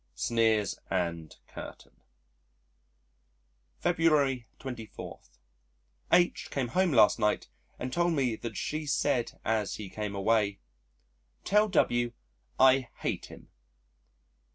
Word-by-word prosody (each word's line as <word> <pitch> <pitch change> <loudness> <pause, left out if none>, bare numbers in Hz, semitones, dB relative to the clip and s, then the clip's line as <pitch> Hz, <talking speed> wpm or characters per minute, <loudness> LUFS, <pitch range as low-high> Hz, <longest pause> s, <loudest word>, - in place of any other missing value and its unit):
(Sneers 110 - +1
and 85 -4 -2
Curtain.) - - -11 1.8
February 150 -8 +2
24. 120 -5 -8 0.9
H 175 0 +3
came 130 -4 -2
home 185 +5 +2
last 115 -3 +5
night 105 -1 0 0.3
and 125 0 -5
told 175 0 +2
me 130 -6 +1
that 110 -3 -7
she 155 0 -3
said 135 -3 0
as 110 -2 0
he 105 -3 -8
came 105 -1 -4
away, 100 0 +1 0.9
"Tell 210 +2 +3
W 120 - +1 0.5
I 130 -1 +5
hate - - -2
him." - - -14
120 Hz, 105 wpm, -29 LUFS, 105-145 Hz, 1.8 s, last